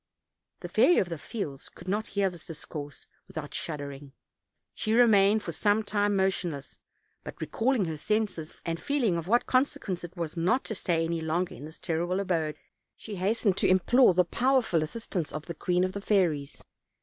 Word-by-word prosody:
The - - -5
Fairy 355 - +4
of 180 - +2
the 165 -3 -5
Fields 145 - -5
could - - -14
not 210 +3 -1
hear 200 -1 +4
this 175 - -12
discourse 150 -2 -8 0.2
without 150 -2 -7
shuddering; 140 -3 -5 0.6
she 215 - -1
remained 215 -3 +5
for 170 - -4
some 205 +6 +2
time 205 -1 +1
motionless; 180 -7 -1 0.4
but - - -9
recalling 235 -3 +1
her 160 -2 -4
senses, 210 -5 -2
and 165 0 -2
feeling 255 -10 +1
of 170 0 -3
what 240 +4 +3
consequence 255 -9 0
it 175 +2 -9
was 165 -1 -3
not 180 +10 +2
to - - -3
stay 170 -5 0
any 165 0 -2
longer 170 +3 -1
in 145 - -9
this 160 +1 -10
terrible 175 +3 -1
abode, 165 -6 0 0.4
she 210 -3 -7
hastened 200 +1 +1
to - - +3
implore 190 +3 +5
the 180 0 +4
powerful 245 -5 +2
as 155 - -2
sistance 190 -7 -4
of 155 0 -6
the 170 - -5
queen 180 +2 +1
of 185 - 0
the 200 - -5
fairies. 170 -9 0
180 Hz, 185 wpm, -28 LUFS, 160-210 Hz, 0.6 s, remained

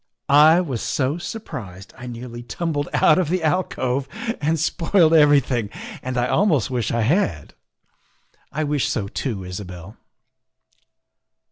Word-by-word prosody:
I 160 +4 +7
was 135 -10 -4
so 145 +4 -1
surprised 125 - -8
I 125 -1 -9
nearly 120 0 -7
tumbled 145 +3 -3
out 155 - +4
of 175 -5 0
the 180 -1 0
alcove 140 -6 0 0.3
and 160 +2 +1
spoiled 165 +2 +2
everything, 140 -8 +4 0.3
and 130 -1 -4
I 120 0 +1
almost 160 - +2
wish 120 -3 -1
I 115 - 0
had." 110 - 0 0.5
" - - -39
I 155 - -2
wish 145 -2 0
so 105 -5 -2
too, 105 -2 -4
Isabel." 90 +1 -8
135 Hz, 135 wpm, -22 LUFS, 115-160 Hz, 0.5 s, I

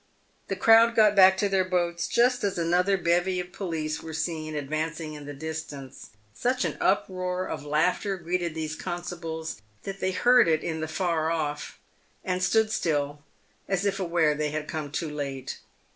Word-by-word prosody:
The - - -2
crowd. 230 +1 +6
got 215 -2 +5
back 190 -1 +7
to 205 - +2
their 195 -1 +2
boats 175 -2 -1
just 245 0 +2
as 200 -3 0
another 180 +3 +2
bevy 175 +1 +1
of 180 0 -5
police 160 -6 -3
were 160 -1 -7
seen 155 -1 -3
advancing 155 +2 -3
in 145 -1 -9
the 145 - -6
distance. 150 -3 -7 0.2
Such 250 - 0
an - - -2
uproar 185 0 0
of - - -5
laughter 180 +7 +1
greeted 175 -1 -2
these 155 -1 -3
constables 165 - -5 0.2
that 195 0 -6
they 190 - 0
heard 245 +5 +5
it 160 -1 +2
in 160 -1 -3
the 155 - -2
far 165 -2 0
off, 150 -3 -3 0.5
and 185 0 -1
stood 220 +3 +3
still, 145 -6 -1 0.5
as 195 0 0
if 200 0 0
aware 170 -4 +2
that 150 0 -1
they 150 -1 0
had 150 0 -4
come 155 -2 -4
too 155 +1 -3
late. 135 -3 -5
170 Hz, 175 wpm, -27 LUFS, 155-190 Hz, 0.5 s, back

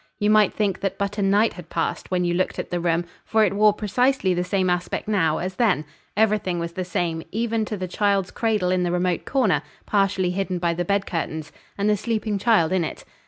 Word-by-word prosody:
You 210 0 +2
might 215 -2 +5
think 200 -3 0
that 195 -2 -2
but 200 +1 -2
a - - +1
night 200 +3 +3
had 180 -3 -11
passed, - - -2
when 180 -1 0
you 175 - +1
looked 185 +2 -1
at - - -5
the 175 - 0
room, 170 0 0 0.2
for 220 -1 +3
it 195 - 0
wore 210 +1 +5
precisely 210 0 +1
the 180 0 0
same 185 0 0
aspect 180 +2 -1
now, 165 -7 +2
as 185 +1 -4
then; 200 -11 +2 0.3
everything 210 -4 +2
was 170 0 -3
the 185 +2 -4
same, 170 -2 -2
even 225 0 0
to 210 - -4
the 185 -1 -4
child's 200 0 0
cradle 210 -6 0
in 185 -1 +2
the 175 -1 0
remote 180 -1 0
corner, 215 - +2 0.2
partially 195 -3 +1
hidden 190 0 -2
by 170 -1 0
the 175 +1 -2
bed 200 +2 +1
curtains, 160 -2 -4 0.3
and 200 +1 0
the 210 - +4
sleeping 215 -1 -2
child 205 -7 +3
in 185 -2 +2
it. - - -6
190 Hz, 225 wpm, -23 LUFS, 175-210 Hz, 0.3 s, might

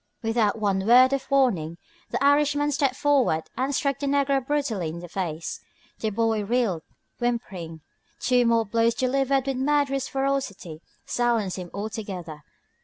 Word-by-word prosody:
Without 225 -2 +1
one 200 -2 0
word 255 +3 +7
of 275 - -3
warning 200 - +1 0.3
the - - -2
Irishman 290 +1 +3
stepped 275 -2 +1
forward 265 - +2
and 265 +2 -1
struck 275 -1 0
the 285 - -2
negro 275 -1 +2
brutally 255 - -1
in 160 - -6
the 175 +1 -8
face. 170 -3 -4 0.4
The 220 - -1
boy 220 0 0
reeled, 215 -6 0 0.4
whimpering. 195 -10 -3 0.4
Two 245 -2 +3
more 230 -1 +3
blows 230 +2 +1
delivered 270 +1 +1
with 270 -2 -2
murderous 275 -1 +1
ferocity 270 - -3 0.2
silenced 230 -6 0
him 180 -1 -6
altogether. 200 -7 -6
240 Hz, 145 wpm, -25 LUFS, 195-275 Hz, 0.4 s, word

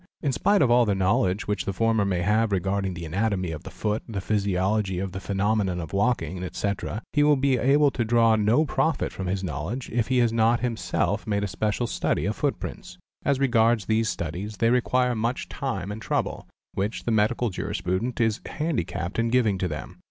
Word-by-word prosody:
In 140 - +1
spite 200 +6 +3
of 120 - +3
all 120 0 +6
the 100 -2 +1
knowledge 95 0 +1
which 105 0 -1
the 100 - -2
former 115 0 +2
may 90 -3 0
have 110 +3 +2
regarding 95 0 -1
the 85 0 -6
anatomy 95 +1 -1
of 75 -2 -6
the - - -9
foot, 105 0 -2
the 105 -3 -3
physiology 100 -1 0
of 95 +1 -3
the 95 - -5
phenomenon 95 -1 0
of 80 +1 -7
walking, 100 -3 0
etc., 100 +3 -3
he 145 - +3
will 150 0 +5
be 135 -1 +2
able 140 +3 +4
to 120 - -1
draw 115 0 +4
no 110 +8 +3
profit 145 +2 0
from 95 - -5
this 95 +1 -2
knowledge, 90 - -4
if 115 -1 0
he 130 0 +1
has 120 -2 +3
not 115 +1 +3
himself 120 -3 -1
made 100 -1 0
a - - 0
special 105 +5 -1
study 85 -8 -1
of 105 +2 -1
footprints. 90 -10 -4 0.3
As 140 -2 +2
regards 115 -5 +3
these 110 +1 +1
studies 95 +6 -4
they 115 +3 +3
require 125 0 +2
much 115 +3 -2
time 100 -8 -3
and 105 +1 -6
trouble, - - -2 0.3
which 100 +4 -2
the 120 - -1
Medical 110 +2 +1
Juris - - -4
prudent 100 +8 -2
is 110 -1 +1
handicapped 95 - -2
in 115 0 +1
giving 115 -6 +2
to 90 - 0
them. 75 -2 -7
110 Hz, 205 wpm, -25 LUFS, 95-120 Hz, 0.3 s, all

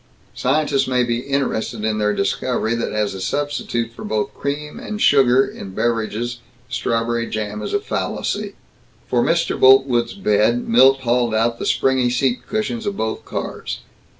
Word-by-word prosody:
Scientists 140 0 +1
may 125 -1 +2
be 120 -1 -1
interested 125 -5 -2
in 110 -1 0
their 105 0 +2
discovery 110 +4 -1
that 115 - -2
as 105 -2 -1
a 95 - -7
substitute 120 -3 -2
for 115 - -10
both 105 0 -2
cream 150 +1 -4
and 210 -1 -5
sugar 135 - +5
in 95 -1 -9
beverages 120 +1 -1 0.3
strawberry 115 -1 -1
jam 105 -1 -3
is - - -4
a - - +1
fallacy. - - -3 0.5
For - - +2
Mr. - - +1
Boltwood's 130 0 +5
bed 115 - +1
Milt 130 +3 +5
hauled 120 -2 +1
out 115 +1 +1
the - - -3
springy 130 -2 +2
seat 125 0 0
cushions 215 +1 -2
of 200 - -2
both 110 0 -3
cars. - - -5
120 Hz, 155 wpm, -20 LUFS, 110-135 Hz, 0.5 s, sugar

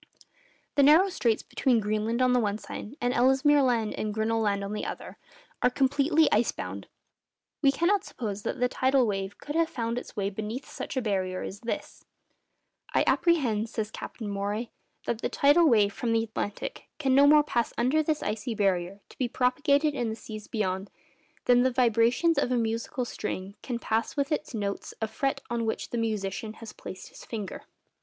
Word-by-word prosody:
The 285 - +3
narrow 315 +8 +6
straits 230 - 0
between 250 -4 +1
Greenland 215 +3 0
on 250 0 +4
the 250 - +4
one 210 -3 0
side, 220 +3 -8
and 245 +1 0
Ellesmere 265 +4 +4
Land 235 -5 +1
and 215 - -3
Grinnell 225 +1 0
Land 200 -2 0
on 200 +1 -4
the 210 - -3
other, - - -6 0.4
are - - +5
completely 285 +4 +3
ice 220 +3 +3
bound. - - -6 0.7
We 275 -2 +5
cannot 375 +7 +2
suppose 210 - -5
that 260 - -3
the 250 - +3
tidal 260 +1 +2
wave 195 -2 -3
could 295 - -6
have 330 0 +2
found 230 -1 -2
its - - -12
way 200 -1 -1
beneath 215 +6 -5
such - - -6
a 255 - 0
barrier 185 -3 -1
as 200 - -6
this. 235 - -5 0.9
'I - - +5
apprehend,' 240 -11 +2
says 215 -1 -3
Captain 220 - -7
Maury, 205 +3 -3 0.3
'that 230 - -2
the - - -1
tidal 295 +3 +5
wave 205 -4 +4
from 230 +1 -1
the 225 0 +2
Atlantic 215 -2 -5
can 270 -4 +1
no 280 +2 +7
more 300 0 +7
pass 240 -5 0
under 260 +6 +3
this 310 -1 -1
icy 215 +2 -3
barrier, 195 -1 0
to - - -17
be 255 - +1
propagated 280 +5 +2
in 240 -5 -1
the 220 - -3
seas 215 -2 -9
beyond, 190 -2 -2 0.6
than 245 0 +5
the 260 - +4
vibrations 245 +6 +3
of 255 - 0
a 250 - +2
musical 230 +3 -1
string 195 -4 -5
can 245 -3 -3
pass 225 +3 -1
with 280 +2 0
its 300 -4 -2
notes 200 -2 -4
a 220 - -1
fret 270 +5 -2
on 235 -1 0
which 225 - -3
the 240 - -2
musician 215 -1 -2
has 225 0 -10
placed 185 - -9
his - - -13
finger. 210 -4 -6
230 Hz, 190 wpm, -28 LUFS, 210-270 Hz, 0.9 s, no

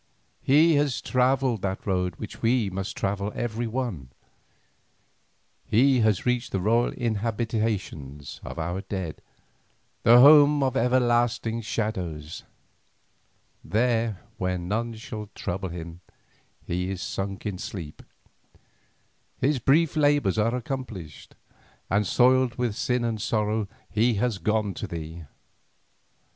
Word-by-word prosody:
He 155 +3 +5
has 145 -3 +1
travelled 130 -3 +1
that 95 -1 -3
road 90 -3 0
which 105 +3 -9
we 115 -3 +2
must 95 +1 -4
travel 100 +1 -1
every 120 0 -2
one, 110 - -4 1.5
he 130 +3 +3
has 110 -4 +2
reached 125 -1 0
the 95 - 0
royal 115 +5 +2
inhabitations 110 - -3
of - - -7
our 90 +3 -3
dead, 95 -5 -5 0.8
the 120 +2 +7
home 145 +1 +7
of 130 -2 0
everlasting 120 -2 +1
shadows. 90 -8 -4 1.2
There 115 -3 0 0.2
where 90 0 0
none 110 +6 -2
shall 110 -2 -7
trouble 95 +1 -3
him 85 0 -8 0.6
he 90 +1 -2
is 95 -2 -4
sunk 95 +2 -4
in 100 -3 -3
sleep. 85 -8 -7 1.4
His 140 +1 +1
brief 155 +6 +3
labours 145 -9 +2
are 115 +3 +2
accomplished, 115 - -6 0.6
and 100 0 +2
soiled 130 +1 +3
with 120 -4 -1
sin 125 +1 0
and 115 -2 -2
sorrow, 105 0 0 0.2
he 115 +2 +2
has 105 -1 0
gone 105 -2 0
to - - -5
thee. 80 0 -7
110 Hz, 120 wpm, -26 LUFS, 95-125 Hz, 1.5 s, the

